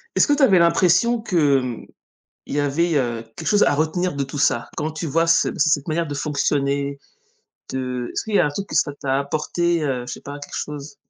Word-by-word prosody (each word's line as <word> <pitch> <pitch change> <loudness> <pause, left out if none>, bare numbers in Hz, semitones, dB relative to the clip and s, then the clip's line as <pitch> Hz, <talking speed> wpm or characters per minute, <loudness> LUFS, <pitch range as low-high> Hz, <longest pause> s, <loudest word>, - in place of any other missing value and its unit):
Est-ce - - +4
que 290 - +3
tu 290 - 0
avais 190 -8 +6
l'impression 180 +7 +3
que, 150 - +2
mmh, 125 -3 -5 0.6
il - - -5
y 145 - +2
avait, 155 +4 +1
heu, 120 -4 -1
quelque 160 - -6
chose 205 0 +4
à - - +3
retenir 160 +2 0
de 140 - -1
tout 135 +2 -7
ça? 120 -4 +1
Quand 155 +2 -2
tu 155 +2 -5
vois 165 +3 +1
ce 165 - +4
ce 155 0 +3
cette 145 0 +1
manière 165 +1 -1
de 145 - -4
fonctionner, 140 -1 -1 0.8
de 125 -2 -3
est-ce - - -3
qu'il 215 -2 -4
y - - +5
a - - +4
un - - -1
truc 195 +7 -5
que - - -6
ça 145 -1 +2
t'a 135 0 0
apporté, 160 +4 -1
heu, 130 -4 -1
je - - -6
sais - - -7
pas, 145 +1 -8
quelque 145 - -10
chose? 150 0 -6
150 Hz, 240 wpm, -22 LUFS, 140-170 Hz, 0.8 s, avais